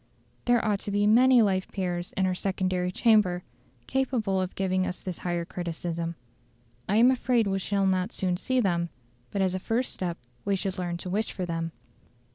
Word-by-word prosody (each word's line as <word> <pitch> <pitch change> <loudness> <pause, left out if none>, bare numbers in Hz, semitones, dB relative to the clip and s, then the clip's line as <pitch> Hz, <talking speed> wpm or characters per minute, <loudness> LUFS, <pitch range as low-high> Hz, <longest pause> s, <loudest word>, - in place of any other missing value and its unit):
There 240 -1 +3
ought 205 -2 +1
to - - -6
be 205 0 +2
many 245 +3 +6
life 190 -2 +1
peers 180 -2 -3
in 190 - +3
our 185 - +1
secondary 185 -1 -1
chamber 190 -5 +3 0.4
capable 235 -8 0
of 185 0 -4
giving 185 -1 +1
us 180 - -4
this 185 -3 -6
higher 175 -1 -2
criticism. 170 -1 -4 0.7
I 200 - +2
am 240 +4 +7
afraid 250 -3 +2
we 195 -1 0
shall 195 +1 0
not 185 +2 +1
soon 185 -2 -1
see 255 +8 0
them, 170 -6 +1 0.4
but 195 - 0
as 185 -1 +1
a 185 - -1
first 230 +6 -1
step 175 -2 -3 0.3
we 200 - +1
should 190 -1 -3
learn 175 -1 -2
to 180 - -7
wish 215 +3 0
for 185 - -3
them. 165 -1 -3
190 Hz, 190 wpm, -27 LUFS, 180-210 Hz, 0.7 s, am